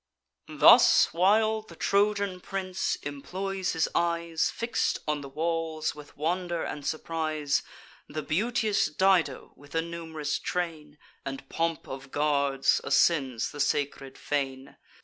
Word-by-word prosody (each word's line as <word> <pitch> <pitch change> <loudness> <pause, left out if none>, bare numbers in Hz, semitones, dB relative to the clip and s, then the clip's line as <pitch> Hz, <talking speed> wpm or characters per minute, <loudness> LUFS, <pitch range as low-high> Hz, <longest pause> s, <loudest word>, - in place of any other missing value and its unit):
Thus - - +6
while 215 +5 +3
the 175 -6 -14
Trojan 200 0 +1
prince 190 -1 -2
employs 185 +7 -3
his 160 -1 +1
eyes, 170 -1 0
Fix'd 230 +1 -1
on 150 -1 0
the 140 - -8
walls 160 +1 -2
with 150 0 -13
wonder 175 +2 -1
and 145 - -5
surprise, 155 -2 -1 0.5
The 155 +1 -4
beauteous 215 +5 +1
Dido, 175 -5 +1
with 145 +2 -14
a 165 - +3
num'rous 160 -3 -4
train 160 -4 -4 0.3
And 135 0 -6
pomp 165 -1 -2
of 135 0 -8
guards, 140 -2 +2
ascends 135 -4 +2
the 145 - -9
sacred 140 -2 -1
fane. 135 -2 -3
160 Hz, 125 wpm, -28 LUFS, 145-180 Hz, 0.5 s, Thus